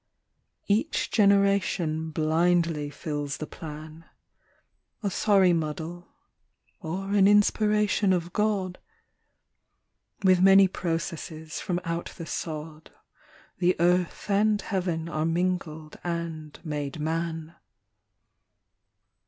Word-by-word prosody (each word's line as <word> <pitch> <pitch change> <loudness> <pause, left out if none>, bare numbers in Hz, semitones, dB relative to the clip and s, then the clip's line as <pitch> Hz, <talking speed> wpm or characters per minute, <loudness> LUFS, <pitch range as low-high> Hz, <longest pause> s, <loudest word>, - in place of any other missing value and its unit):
Each 220 +10 0
generation 195 -6 +2
blindly 160 0 +1
fills 145 -1 -4
the 155 - -5
plan, 155 +1 -9 1.0
A 200 - 0
sorry 195 -2 +4
muddle 165 +2 -4 0.7
or 190 +5 -4
an 200 -1 +5
inspiration 210 -1 +3
of 175 -1 -1
God; 200 -4 0 1.4
With 185 -1 +5
many 195 0 +7
processes 165 -3 -4
from 175 -1 -2
out 170 +1 -3
the 165 - -6
sod, 155 -1 -6 0.7
The 180 0 +3
Earth 180 +1 +1
and 210 +1 +3
Heaven 175 -6 -2
are 155 -2 -2
mingled 165 -2 -2
and 165 -3 -5
made 150 -3 -4
man. 165 +1 -3
170 Hz, 95 wpm, -27 LUFS, 160-190 Hz, 1.4 s, many